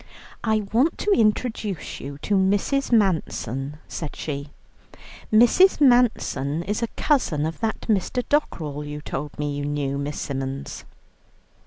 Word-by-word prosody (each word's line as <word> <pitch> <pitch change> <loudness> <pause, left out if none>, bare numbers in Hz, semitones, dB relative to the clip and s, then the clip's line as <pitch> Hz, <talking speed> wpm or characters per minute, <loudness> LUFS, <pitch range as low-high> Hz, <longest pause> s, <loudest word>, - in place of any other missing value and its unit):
"I 220 -1 +2
want 265 +8 +3
to 415 - 0
introduce 215 - 0
you 140 0 -7
to 210 - 0
Mrs. 200 +9 +2
Manson," 150 - 0
said 155 -3 -5
she. 140 -1 -5 0.8
"Mrs. 240 - +6
Manson 240 - +3
is 210 +5 -2
a 235 - 0
cousin 175 - +1
of 160 +1 -4
that 225 -1 -2
Mr. 220 +4 0
Dockerell 155 - -1
you 150 0 -6
told 145 -1 -5
me 145 -1 -2
you 145 - -3
knew, 145 -1 -2
Miss 145 +1 -4
Symons." 135 0 -4
175 Hz, 135 wpm, -24 LUFS, 145-230 Hz, 0.8 s, Mrs